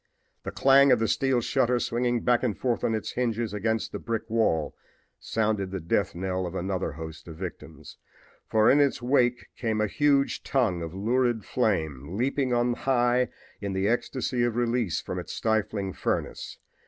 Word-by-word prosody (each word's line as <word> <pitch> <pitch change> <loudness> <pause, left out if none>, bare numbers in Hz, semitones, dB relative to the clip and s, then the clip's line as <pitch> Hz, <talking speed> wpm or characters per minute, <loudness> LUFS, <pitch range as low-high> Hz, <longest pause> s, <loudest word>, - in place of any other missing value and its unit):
The - - -5
clang 135 0 +5
of 125 - +6
the 115 0 0
steel 135 0 +1
shutter 120 +1 +1
swinging 120 0 0
back 120 0 +2
on 105 - 0 0.4
its 110 - -4
hinges 115 -3 -1
against 110 +2 -1
the - - -5
brick 115 -1 -3
wall 80 -10 +1 0.5
sounded 105 -3 -1
the 95 0 -4
death 85 0 0
knell 95 0 -2
of 90 - -7
another 95 -3 -2
host 80 +1 -9
of 80 - -8
victims, 90 +1 -9 0.5
for 110 0 +4
in 145 - +5
its 140 -2 +2
wake 125 -2 +2
came 110 -3 -1
a 110 - +3
huge 140 +5 +2
tongue 110 -11 0
of 85 +1 -6
lurid 120 +1 +1
flame, 80 - -1
leaping 130 +2 0
on 120 0 +2
high 125 -1 +2 0.3
in 100 -1 -4
the 95 +1 0
ecstasy 120 +2 -1
of 120 -2 0
release 120 -5 0
from - - -5
its - - -7
stifling 105 -3 -1
furnace. - - -3
115 Hz, 165 wpm, -27 LUFS, 95-125 Hz, 0.5 s, of